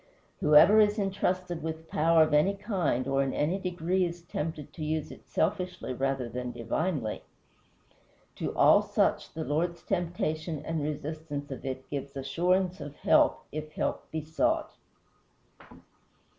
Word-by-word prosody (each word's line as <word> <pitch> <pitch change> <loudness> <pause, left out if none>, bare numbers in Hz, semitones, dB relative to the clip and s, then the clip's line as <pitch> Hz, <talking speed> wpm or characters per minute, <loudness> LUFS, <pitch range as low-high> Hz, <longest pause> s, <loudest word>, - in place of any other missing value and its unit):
Whoever 155 +8 +7
is 210 0 +4
intrusted 185 -4 -1
with 160 +1 -5
power 165 +1 +4
of 155 - -1
any 185 +7 +4
kind 185 - -1
or 135 0 +2
in 135 -1 -1
any 165 +7 0
degree 180 0 0
is 170 -1 -4
tempted 155 -2 -5
to 155 - -6
use 155 0 -2
it - - -13
selfishly 180 -5 -1
rather 135 -1 -1
than 125 +1 -4
divinely. 120 0 -2 1.2
To - - -2
all - - +6
such - - 0
the 160 - -3
Lord's 170 +4 -1
temptation 165 -4 -2
and 160 -1 -2
resistance 150 -1 -4
of 135 - -6
it 130 0 -5
gives 140 -1 -5
assurance 175 +6 0
of 145 0 -7
help - - +3
if 155 0 -6
help - - -2
be 160 -1 -4
sought. 310 - 0
160 Hz, 145 wpm, -29 LUFS, 145-180 Hz, 1.2 s, Whoever